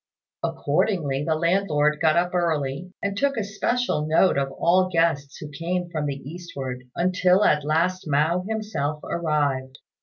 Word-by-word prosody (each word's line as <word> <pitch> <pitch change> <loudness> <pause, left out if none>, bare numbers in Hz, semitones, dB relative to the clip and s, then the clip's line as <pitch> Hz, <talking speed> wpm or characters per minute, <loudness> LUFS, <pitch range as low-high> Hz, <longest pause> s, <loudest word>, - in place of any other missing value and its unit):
Accordingly 145 -9 0
the 160 - +1
landlord 155 -3 +1
got 160 -1 +4
up 175 +1 +1
early, 160 -1 -1
and 200 -1 -1
took 275 +4 0
especial 210 -4 -1
note 160 +4 +4
of 135 -1 0
all 185 +2 +3
guests 165 -4 +1
who 150 -1 -8
came 175 +3 -3
from 155 -3 -2
the 140 -1 -3
eastward, 135 -7 -6
until 185 +2 +3
at 150 -5 +3
last 170 +5 0
Mao 155 +5 +2
himself 210 -10 -2
arrived. 145 -5 -1
165 Hz, 145 wpm, -24 LUFS, 145-185 Hz, -, got